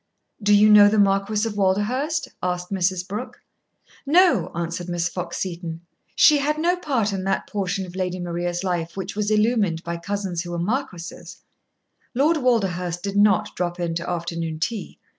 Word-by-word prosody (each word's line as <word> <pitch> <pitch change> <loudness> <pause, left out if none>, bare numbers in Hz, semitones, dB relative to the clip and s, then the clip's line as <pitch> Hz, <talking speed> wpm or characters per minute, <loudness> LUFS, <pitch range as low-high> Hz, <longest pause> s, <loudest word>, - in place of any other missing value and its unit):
"Do 205 0 +4
you 210 +1 +6
know 210 -1 +8
the 215 - +1
Marquis 200 +2 +2
of 220 - -4
Walderhurst?" 220 +11 0
asked 180 0 -3
Mrs. 185 -1 0
Brooke. 210 +7 -6 0.6
"No," 350 +5 +4
answered 170 +1 -4
Miss 175 0 0
Fox 180 -1 -5
Seton. 170 -3 -5 0.3
She 300 -2 +6
had 300 +2 0
no 345 +3 +2
part 255 - -1
in 190 -1 -3
that 195 - 0
portion 195 -1 -2
of 180 0 -11
Lady 185 -1 -2
Maria's 175 0 -3
life 175 -2 -2
which 190 0 -5
was 210 0 -1
illumined 210 -6 +1
by 170 0 -4
cousins 190 -1 -3
who 175 - -7
were 175 - -3
marquises. 180 -2 -4 0.7
Lord 305 +6 +3
Walderhurst 185 - 0
did 200 0 -3
not 205 -2 +3
drop 175 0 -2
in 170 -1 -1
to 170 +1 -4
afternoon 170 -2 -3
tea. 215 +5 -3
190 Hz, 170 wpm, -23 LUFS, 175-215 Hz, 0.7 s, know